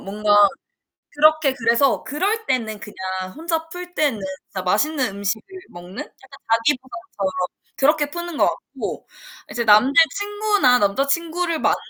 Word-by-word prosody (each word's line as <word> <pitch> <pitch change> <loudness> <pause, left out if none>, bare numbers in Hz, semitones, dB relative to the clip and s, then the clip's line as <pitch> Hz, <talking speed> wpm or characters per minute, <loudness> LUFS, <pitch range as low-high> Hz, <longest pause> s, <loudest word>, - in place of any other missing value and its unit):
뭔가 210 +2 -3 0.8
그렇게 305 -2 +4
그래서 240 +2 +2
그럴 405 +10 -1
때는 220 -5 -1
그냥 185 -3 -6
혼자 325 0 -3
풀 355 +1 -8
때는 285 -11 0 0.3
진짜 190 - -6
맛있는 275 +6 +1
음식을 200 +2 -2 0.3
먹는 175 +2 -12
약간 270 +1 -10
자기 230 +5 +3
보상처럼 230 -6 -6 0.4
그렇게 290 +1 +2
푸는 345 0 -6
것 - - +4
같고 - - -5 0.4
이제 235 - -2
남자 215 +5 +6 0.2
친구나 410 -10 +2
남자 205 +7 +1
친구를 335 +2 -1
만날 - - +2
270 Hz, 300 characters per minute, -21 LUFS, 215-325 Hz, 0.8 s, 남자